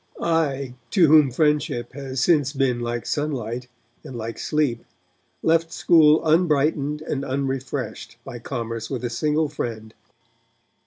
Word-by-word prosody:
I, 140 -6 0 0.2
to 180 -5 +4
whom 150 -2 +6
friendship 145 -3 0
has 135 -1 -3
since 145 -5 +3
been 135 -3 +1
like 120 0 -3
sunlight 125 -5 -3 0.4
and 130 - -9
like 115 0 -5
sleep, 145 -7 0 0.6
left 165 0 +2
school 160 -3 +5
unbrightened 150 -2 +2
and 140 -3 -3
unrefreshed 135 -2 -4
by 125 -3 -7
commerce 115 -2 -5
with 125 -2 -4
a 120 - -3
single 155 +4 +1
friend. 115 -6 -5
140 Hz, 125 wpm, -23 LUFS, 120-155 Hz, 0.6 s, whom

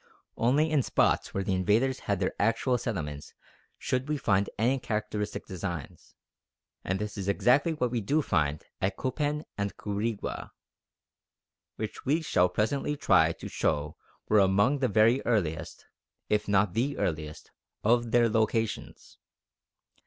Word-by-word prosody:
Only 145 +7 +2
in 150 -3 +3
spots - - +1
where 95 - -2
the 95 - -1
invaders 110 +8 +2
had 100 -2 -2
their 95 - 0
actual 120 +4 +1
settlements 75 - -5 0.4
should 130 +3 -2
we 150 - 0
find 100 -7 +1
any 125 +5 +2
characteristic 105 -2 -3
designs. 85 -5 -6 0.7
And 95 - -1
this 105 0 -5
is 95 - -4
exactly 135 - +3
what 125 -5 -1
we 120 -2 -1
do 145 +9 +1
find 75 - 0 0.2
at 95 +1 0
Copan 145 +3 -2
and 100 0 -2
Quirigua, 105 +1 -3 1.2
which 110 -1 -6
we 155 +5 +1
shall 90 - +3
presently 135 +9 -1
try 80 -10 +4
to - - -9
show 75 0 -1 0.3
were 105 - +4
among 100 +8 +3
the 130 - +2
very 115 +4 +3
earliest, 80 -9 -1 0.4
if 105 0 +1
not 100 -2 +2
the 135 +6 0
earliest, 75 -2 -3 0.3
of 120 +1 +3
their 120 0 +4
locations. 110 0 -2
105 Hz, 140 wpm, -28 LUFS, 95-125 Hz, 1.2 s, try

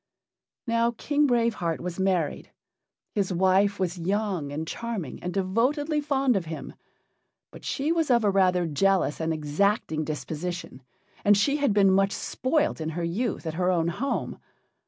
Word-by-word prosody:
Now, 230 0 +1
King 295 0 +2
Brave 235 -2 +2
Heart 170 -5 -2
was 180 +1 -5
married. 185 -5 0 0.6
His 200 -2 0
wife 190 +3 +3
was 180 -1 -1
young 190 -4 -1
and 155 +3 -4
charming, 215 - -5
and 180 - -3
devotedly 255 - 0
fond 275 -4 +1
of 190 -4 -1
him. 160 0 -7 0.8
But - - -13
she 290 +3 -1
was 330 -3 +1
of 240 -2 +4
a 205 - +3
rather 185 -2 +3
jealous 180 +1 +1
and 160 0 -1
exacting 155 +2 0
disposition, 155 -1 -5 0.4
and 205 0 +5
she 280 +8 +2
had 285 -5 +2
been 200 -1 +4
much 195 +1 +3
spoilt 295 - -1
in 155 - -2
her 170 +2 -4
youth 190 +5 -2
at 160 - -3
her 180 +2 0
own 170 -2 +2
home. 260 +11 -3
195 Hz, 160 wpm, -26 LUFS, 170-235 Hz, 0.8 s, and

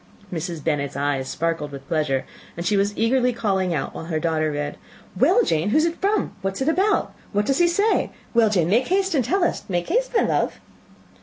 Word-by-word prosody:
Mrs. 170 -2 -4
Bennet's 140 -4 -1
eyes 140 -2 -1
sparkled 165 -3 -2
with 135 -1 -9
pleasure, 150 -5 0 0.3
and 170 - -4
she 205 - +2
was 200 +1 +1
eagerly 250 +2 +2
calling 195 -6 0
out, 150 -5 -2
while - - -7
her 160 -2 -2
daughter 155 -1 0
read, 145 0 -3 0.4
"Well, 355 - +4
Jane, 160 - +1
who 225 - +3
is 310 - +4
it 335 0 -3
from? 410 +2 +1
What 195 -1 -2
is 265 - -2
it 290 - +2
about? 390 +5 +1 0.2
What 205 +1 +1
does 275 +6 +1
he 345 - +5
say? 405 +6 +2 0.2
Well, 230 -2 +4
Jane, 180 -6 +2
make 235 +8 +2
haste 385 0 +1
and 275 -5 +2
tell 360 - +1
us; - - 0
make 175 -2 -1
haste, - - +1
my - - +4
love." - - 0
195 Hz, 220 wpm, -23 LUFS, -, 0.4 s, he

